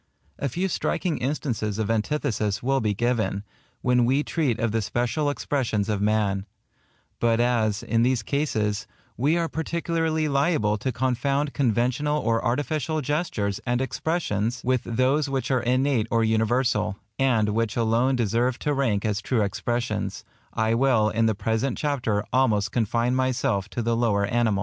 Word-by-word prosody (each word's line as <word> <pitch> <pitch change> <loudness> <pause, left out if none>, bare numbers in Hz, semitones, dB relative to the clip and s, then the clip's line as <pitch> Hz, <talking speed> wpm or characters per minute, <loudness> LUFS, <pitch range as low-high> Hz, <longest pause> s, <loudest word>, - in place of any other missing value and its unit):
A 140 - -1
few 180 +9 -1
striking 180 -1 -1
instances 120 -6 -2
of 110 0 0
antithesis 110 -3 -1
will 135 +2 +2
be 105 -2 0
given, 110 -4 0 0.4
when 125 -1 +3
we 135 +5 +2
treat 145 -10 0
of 115 -2 0
the 115 +1 0
special 120 +8 0
expressions 120 -8 -1
of 105 -2 0
man; 105 -2 +1 0.7
but 115 -1 +2
as, 115 -4 +1
in 115 -1 +1
these 125 -1 +2
cases, 105 -7 -1 0.3
we 145 +8 +2
are 170 -1 0
particularly 160 -1 -1
liable 140 -7 +2
to 130 - -1
confound 130 +4 0
conventional 130 +4 +1
or 115 -4 0
artificial 150 +4 -1
gestures 135 - -1
and 125 -1 0
expressions 120 - -1
with 130 -1 +1
those 130 +5 +1
which 135 0 -2
are 130 -2 +2
innate 125 -1 +1
or 115 -1 +2
universal, 110 -1 +1 0.2
and 120 -6 +3
which 115 +1 -1
alone 120 +3 +2
deserve 120 +2 +1
to 150 - -1
rank 115 -8 0
as 105 -1 0
true 115 -3 +1
expressions, 120 +4 -2 0.3
I 110 +1 +1
will 115 -3 +3
in 115 +1 +1
the 110 - +1
present 115 +5 -1
chapter 125 -8 -1
almost 110 -6 +2
confine 120 +1 +1
myself 125 -6 0
to 120 - -3
the 115 +1 +1
lower 110 -4 +2
animals. 110 -2 +1
120 Hz, 155 wpm, -25 LUFS, 110-135 Hz, 0.7 s, when